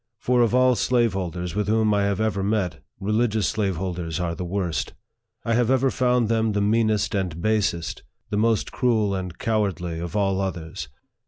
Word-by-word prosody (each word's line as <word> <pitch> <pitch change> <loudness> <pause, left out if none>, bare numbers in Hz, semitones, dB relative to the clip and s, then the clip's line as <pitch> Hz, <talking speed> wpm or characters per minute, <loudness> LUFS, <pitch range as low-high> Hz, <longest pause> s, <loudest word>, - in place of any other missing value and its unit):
For 125 +1 +2
of 120 0 +3
all 130 0 +5
slaveholders 95 -9 0
with 105 0 -1
whom 110 0 +3
I 100 -1 +2
have 100 0 0
ever 110 -2 0
met, 95 -5 -1 0.2
religious 105 +1 +1
slaveholders 90 -5 -2
are 85 -1 -1
the 85 - -5
worst. 90 -4 -2 0.5
I 115 - +1
have 120 0 +2
ever 130 0 +3
found 125 -2 +2
them 110 -1 +1
the 100 - +1
meanest 110 +1 +2
and 90 -5 -2
basest, 105 -4 0 0.3
the 105 - 0
most 110 0 +1
cruel 110 -5 +1
and 90 -3 -4
cowardly, 95 -7 -1
of 85 +3 -5
all 95 -2 +1
others. 85 -4 -4
105 Hz, 170 wpm, -24 LUFS, 90-110 Hz, 0.5 s, all